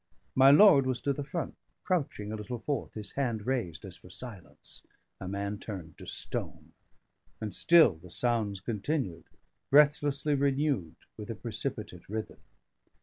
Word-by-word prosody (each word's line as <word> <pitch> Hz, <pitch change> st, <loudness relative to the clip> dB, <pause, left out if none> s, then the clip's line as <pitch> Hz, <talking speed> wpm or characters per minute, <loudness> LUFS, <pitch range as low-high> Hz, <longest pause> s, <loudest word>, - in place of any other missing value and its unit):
My 135 Hz, +1 st, +7 dB
lord 145 Hz, -4 st, +8 dB
was 130 Hz, -2 st, 0 dB
to 140 Hz, -, +1 dB
the 145 Hz, -, -4 dB
front, 140 Hz, -, -4 dB, 0.3 s
crouching 140 Hz, -, -1 dB
a -, -, -3 dB
little 110 Hz, +3 st, -5 dB
forth, 135 Hz, +2 st, -3 dB
his 105 Hz, -2 st, -7 dB
hand 120 Hz, -6 st, -2 dB
raised 115 Hz, -11 st, -2 dB
as 95 Hz, -2 st, -8 dB
for 90 Hz, -, -15 dB
silence: 100 Hz, -2 st, -8 dB, 0.4 s
a 95 Hz, -, -6 dB
man 100 Hz, +1 st, -3 dB
turned 90 Hz, -7 st, -7 dB
to -, -, -10 dB
stone. -, -, -4 dB, 0.7 s
And 105 Hz, -3 st, -4 dB
still 160 Hz, -, +6 dB
the 90 Hz, +3 st, -14 dB
sounds 105 Hz, -1 st, -1 dB
continued, 110 Hz, -, -2 dB, 0.4 s
breathlessly 145 Hz, 0 st, +4 dB
renewed 140 Hz, -, +1 dB, 0.2 s
with -, -, -8 dB
a -, -, -3 dB
precipitate 90 Hz, 0 st, -5 dB
rhythm. 110 Hz, +1 st, -5 dB
120 Hz, 145 wpm, -30 LUFS, 100-140 Hz, 0.7 s, lord